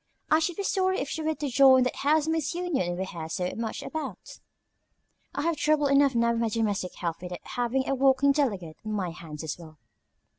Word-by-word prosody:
I 310 - +6
should 325 +2 -1
be 400 - -3
sorry 375 -1 +1
if 275 - -3
she 320 - -3
were 315 0 0
to 295 - -3
join 260 0 +6
that 250 - -2
housemaid's 310 +1 +1
union 275 - -1
we 190 - -2
hear 165 -4 -7
so 180 +2 -2
much 225 -1 -4
about. 315 -1 -6 1.0
I - - -1
have 335 -1 0
trouble 300 0 +2
enough 275 -1 +4
now 235 0 +3
with 230 0 -1
my 230 - +1
domestic 205 -4 -1
help 170 -2 -4
without 180 -1 -6
having 245 +2 -1
a - - +1
walking 270 +1 +4
delegate 200 - -1
on 215 0 -4
my 185 -4 -2
hands 160 -2 -9
as 160 +2 -4
well." 160 -2 -13
260 Hz, 210 wpm, -27 LUFS, 185-300 Hz, 1.0 s, I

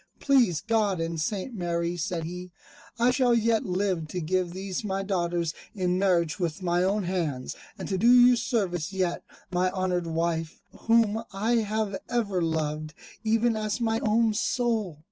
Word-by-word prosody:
"Please 240 - +3
God 210 -3 +1
and 165 -1 -2
St. 205 - -3
Mary," 170 -3 -2
said 170 0 -3
he, 180 +2 -6 0.5
"I 240 +2 +4
shall 250 -2 +3
yet 230 -1 +1
live 185 -3 -1
to 180 - -4
give 180 +2 0
these 190 +2 -4
my 195 -1 -2
daughters 175 -4 -1 0.2
in 180 -2 0
marriage 175 -5 +1
with 175 +1 -2
my 175 0 +1
own 195 +3 +1
hands, 165 -8 -2 0.2
and - - -6
to 190 -2 -1
do 235 +4 +5
you 250 0 +7
service 195 -8 -1
yet, 185 -3 -1 0.3
my 180 +1 +2
honoured 185 -2 -1
wife, 165 0 -2
whom 225 -1 +2
I 220 +5 +1
have 215 -2 -1
ever 205 -6 0
loved, 155 -2 -2 0.3
even 225 +1 +2
as 215 +1 -2
my 225 -1 +1
own 220 0 +2
soul." 220 - -1
190 Hz, 165 wpm, -27 LUFS, 170-220 Hz, 0.5 s, you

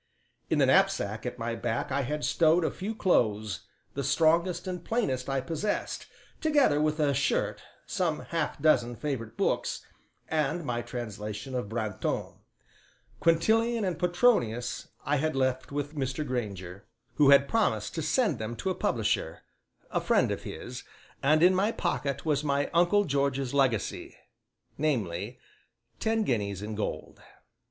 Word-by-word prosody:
In - - +2
the - - +5
knapsack 110 +4 +2
at 125 - -5
my 115 -1 -2
back 115 +2 -2
I 140 +1 +1
had 150 +3 -2
stowed 165 +1 +3
a - - 0
few 215 +4 -5
clothes, 110 - +1 0.3
the 140 - -3
strongest 165 +6 +2
and 180 -2 -4
plainest 140 - -1
I 135 -1 0
possessed, 170 +8 -3 0.3
together 285 - +3
with 155 +1 +1
a 145 -2 +3
shirt, 135 0 0 0.2
some 165 -4 -1
half 165 -4 -2
dozen 120 -5 +3
favorite 115 -3 -4
books, - - -1 0.4
and 155 +1 0
my 120 -2 -1
translation 110 0 -6
of 125 -5 -2
Brantome; 110 -3 -3 0.8
Quintilian 220 +7 +3
and 180 -2 -2
Petronius 175 - +1 0.2
I 145 +1 +2
had 155 +2 0
left 130 0 0
with 145 +1 -3
Mr. 135 +1 -2
Grainger, 100 -7 -5 0.3
who 145 -2 +6
had 140 0 +7
promised 110 - 0
to 165 - -2
send 215 - +1
them 110 +2 -4
to 185 - -2
a - - +1
publisher, 110 - -1 0.5
a - - 0
friend - - +2
of - - -3
his, - - -7 0.4
and 155 +4 +4
in 180 +1 +7
my 195 +4 +2
pocket 140 - -2
was 150 -2 +1
my 140 -1 0
uncle 175 +5 +4
George's 140 -2 0
legacy, 130 -7 0 0.6
namely, 115 - -1 0.6
ten 225 0 +1
guineas 100 - -1
in 110 +1 -4
gold. 105 0 -4
140 Hz, 145 wpm, -29 LUFS, 120-165 Hz, 0.8 s, had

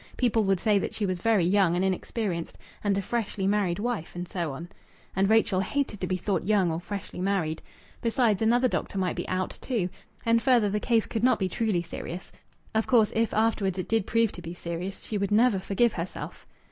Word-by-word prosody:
People 235 -3 +2
would 195 -2 +2
say 210 -1 +3
that - - -4
she 210 - 0
was 185 -2 -2
very 215 -5 +3
young 185 -2 +3
and 180 +2 +1
inexperienced, 190 -2 -2 0.3
and 200 -2 +2
a 200 - -1
freshly 210 -3 -2
married 195 -3 +1
wife, 215 -7 -3
and 175 0 -4
so 170 -4 -3
on. 160 +6 -7 0.5
And 195 +1 +2
Rachel 220 -3 +3
hated 210 +1 -1
to 185 - -1
be 185 - 0
thought 190 +2 -1
young 195 -4 +2
or 160 - -2
freshly 195 0 -6
married. 180 -5 0 0.4
Besides, 230 -3 +2
another 240 +3 +4
doctor 205 - -3
might 185 -2 0
be - - -4
"out" 185 0 -2
too. 220 -9 -1 0.4
And 230 0 +4
further, 235 -6 +3
the 210 - 0
case 230 0 +2
could 225 -1 -3
not 255 - +5
be 190 - 0
truly 195 -2 0
serious. 175 +1 -7 0.4
Of 220 0 +1
course, 225 -4 +4
if 225 0 +1
afterwards 215 -4 +1
it 185 - -3
did 225 -3 +1
prove 230 -1 +2
to 175 - -10
be 170 +1 -7
serious, 175 +3 -5
she 210 - -3
would 200 -1 0
never 220 -1 +4
forgive 205 +5 +1
herself. 175 +1 -6
200 Hz, 210 wpm, -27 LUFS, 185-225 Hz, 0.5 s, not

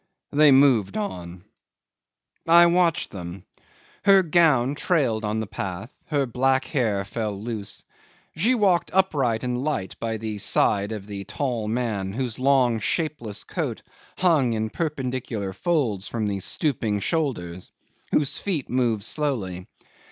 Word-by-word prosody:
They 150 0 +6
moved 130 - +4
on. 90 - -5 1.0
'I 170 +1 +8
watched 170 -1 +2
them. 90 -1 -8 0.6
Her 195 -2 +6
gown 150 -7 +3
trailed 140 -9 0
on 105 +1 -1
the - - -3
path, 100 +4 -6
her 145 -3 +1
black 130 +2 +1
hair 110 -9 0
fell 105 -1 -4
loose. 110 -2 -5 0.5
She 220 +11 +2
walked 195 -6 +2
upright 135 -12 +2
and 125 0 -2
light 140 -11 -2
by 115 -1 -2
the 110 -1 -5
side 100 +1 +2
of 105 -3 -5
the 100 -1 -7
tall 115 0 -2
man, 110 -5 -2
whose 125 0 -3
long 130 -4 +3
shapeless 120 -4 -2
coat - - -4 0.3
hung 155 -10 +3
in 110 0 -2
perpendicular 130 - -3
folds 115 - -1
from 115 -2 -2
the 100 -1 -2
stooping 110 - -1
shoulders, 95 - -2 0.4
whose 145 -1 +1
feet 170 -10 -3
moved 120 -5 +1
slowly. 110 - -2
120 Hz, 135 wpm, -24 LUFS, 105-150 Hz, 1.0 s, I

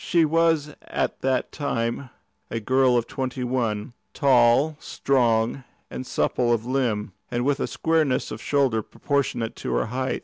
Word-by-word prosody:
She 170 -2 +3
was 160 -2 +2
at - - -2
that 130 -1 0
time 125 -2 -2 0.4
a 115 - -2
girl 130 +2 +3
of 120 - 0
twenty 130 0 -4
one, 120 -3 -2 0.2
tall, 130 +3 +4
strong, 120 -1 +1 0.3
and 130 - -6
supple 120 -1 +1
of 115 -1 +1
limb, 120 -6 -1 0.2
and 120 0 -1
with 140 0 +1
a - - -1
squareness 160 -5 0
of 110 - -6
shoulder 135 -6 +1
proportionate 120 -2 -2
to - - -3
her - - +1
height. 130 +3 -2
130 Hz, 150 wpm, -24 LUFS, 115-140 Hz, 0.4 s, tall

